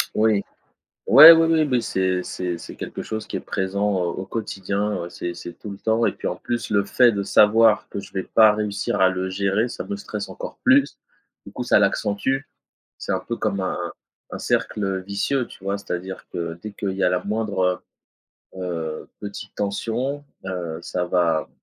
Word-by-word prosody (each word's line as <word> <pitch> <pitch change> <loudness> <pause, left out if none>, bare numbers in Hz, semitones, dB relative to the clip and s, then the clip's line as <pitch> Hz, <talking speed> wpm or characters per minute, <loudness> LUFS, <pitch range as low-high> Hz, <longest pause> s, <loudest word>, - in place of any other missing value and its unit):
Oui. 110 -2 +3 0.6
Ouais, 160 +2 +12
oui, 165 0 +6
oui, 160 -1 +4
oui, 125 -1 +3
c'est 95 -3 0
c'est 90 -1 -4
c'est - - -10
quelque - - -6
chose 110 -1 -5
qui - - -3
est - - -4
présent 100 +1 -1
au 90 -2 0
au 95 - -5
quotidien. 100 0 -2
Ouais 85 - -6
c'est 85 0 -5
c'est 85 0 -8
tout 105 - -9
le 100 - -8
temps 110 +3 +1
et - - +2
puis - - -5
en - - -2
plus, 120 0 -4
le 100 -1 +2
fait 120 +2 +4
de 100 -1 -2
savoir 110 +2 +5
que - - -5
je 100 - -11
vais 95 - -2
pas 110 +1 +5
réussir 105 -2 -2
à 95 - +6
le 95 0 -2
gérer, 100 +4 0
ça - - -6
me 205 - -4
stresse 200 - -6
encore - - -8
plus. 270 +2 +4 0.5
Du - - -10
coup 125 - -4
ça 120 - +4
l'accentue. 105 +5 +1 0.6
C'est - - -3
un 95 - 0
peu 115 +5 -4
comme 105 -3 -1
un 95 - -1
un 85 0 -4 0.4
un - - -4
cercle 95 -3 -1
vicieux 100 +7 -1
tu - - -15
vois? 100 +1 -1
C'est 100 - -16
à 90 - 0
dire 95 +1 -8
que 85 -1 -4
dès 105 - -6
qu'il 100 -1 -3
y 95 0 -3
a 90 - +4
la 90 0 0
moindre, 100 -4 0 0.8
heu 95 - -6
heu, 80 -3 -4
petite 105 0 -8
tension, 115 +8 -2 0.2
heu, 85 -4 -4
ça 90 +1 -2
va 85 -3 +1
100 Hz, 210 wpm, -23 LUFS, 95-110 Hz, 0.8 s, Ouais